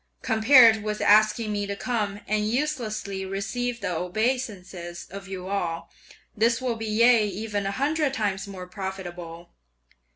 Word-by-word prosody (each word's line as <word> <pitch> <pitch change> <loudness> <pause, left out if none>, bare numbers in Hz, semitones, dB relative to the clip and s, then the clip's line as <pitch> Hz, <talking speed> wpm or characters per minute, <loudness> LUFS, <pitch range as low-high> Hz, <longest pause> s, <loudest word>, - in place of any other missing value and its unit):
Compared 225 -1 +6
with 210 0 -3
asking 215 +1 +4
me 205 -1 -2
to 200 - -3
come, 210 -3 -2
and 210 0 0
uselessly 225 -7 -2
receive 230 +5 -3
the 180 -3 -2
obeisances 185 -3 -3
of 195 0 -8
you 185 -1 -6
all, 175 -4 -3 0.4
this 230 +2 +2
will 250 -2 -1
be 225 0 -5
yea 225 0 +4
even 205 0 -3
a - - -1
hundred 290 +5 0
times 200 -2 -2
more 190 -2 -8
profitable! 175 -3 -7
210 Hz, 140 wpm, -25 LUFS, 190-230 Hz, 0.4 s, Compared